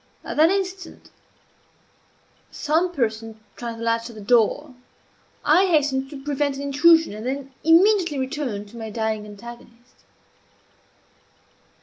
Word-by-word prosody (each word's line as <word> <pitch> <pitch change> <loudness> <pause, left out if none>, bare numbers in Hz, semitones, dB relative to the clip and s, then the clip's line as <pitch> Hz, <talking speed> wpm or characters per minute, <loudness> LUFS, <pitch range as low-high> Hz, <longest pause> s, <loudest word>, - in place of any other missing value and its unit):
At - - -6
that 315 +2 +6
instant 380 -2 -4 1.4
some 320 +4 0
person 225 -6 -3 0.2
tried 235 -1 -6
the 230 - -7
latch 230 +1 0
of 230 - -12
the 215 - -9
door. 245 +6 +2 0.7
I 360 +6 +5
hastened 280 -5 +1
to 275 -2 -10
prevent 285 -1 -1
an 275 - -6
intrusion, 320 +1 +4
and 215 +1 -8
then 270 +2 -4
immediately 345 -1 +4
returned 260 -6 -3
to 235 - -13
my 225 -1 -6
dying 220 -1 -3
antagonist. 235 +3 -13
270 Hz, 125 wpm, -23 LUFS, 230-315 Hz, 1.4 s, that